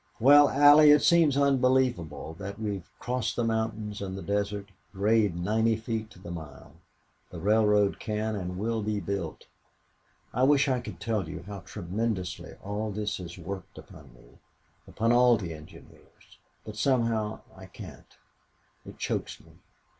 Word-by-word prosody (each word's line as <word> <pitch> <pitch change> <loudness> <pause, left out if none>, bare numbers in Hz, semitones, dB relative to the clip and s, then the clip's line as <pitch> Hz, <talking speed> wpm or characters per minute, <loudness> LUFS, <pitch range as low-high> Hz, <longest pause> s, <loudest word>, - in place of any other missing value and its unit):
Well 145 +4 +7
Allie, 145 +2 +7
it 150 0 +6
seems 165 -5 +4
unbelievable 130 - +1
that 100 0 -6
we 105 -2 -2
have 95 -4 -8
crossed 120 -2 -2
the 120 - 0
mountains 110 -2 -2
and 95 -1 -5
the 95 - -7
desert 100 +1 -2 0.2
grade 105 -1 +2
ninety 110 +6 +1
feet 110 0 -4
to 105 - -17
the 90 -2 -9
mile! 80 -4 -10 0.6
The - - -9
railroad 105 -1 +2
can 110 0 -2
and 90 -2 -5
will 110 +3 -1
be 105 0 -2
built. 95 -3 -5 0.9
I 125 - -1
wish 140 +1 +4
I 130 -2 +1
could 120 - -9
tell 105 -7 -2
you 85 - -7
how 100 +1 -8
tremendously 95 +1 -4
all 105 +2 -3
this 105 -1 -3
has 85 -1 -9
worked 95 +1 -8
upon - - -13
me - - -21 0.5
upon 115 +1 0
all 120 -1 +5
the 85 -6 -5
engineers. 75 0 -16 0.3
But 110 0 -8
somehow 115 -4 0
I - - -12
can't. - - -13 0.7
It - - -12
chokes - - -3
me. - - -19
105 Hz, 155 wpm, -28 LUFS, 95-115 Hz, 0.9 s, Well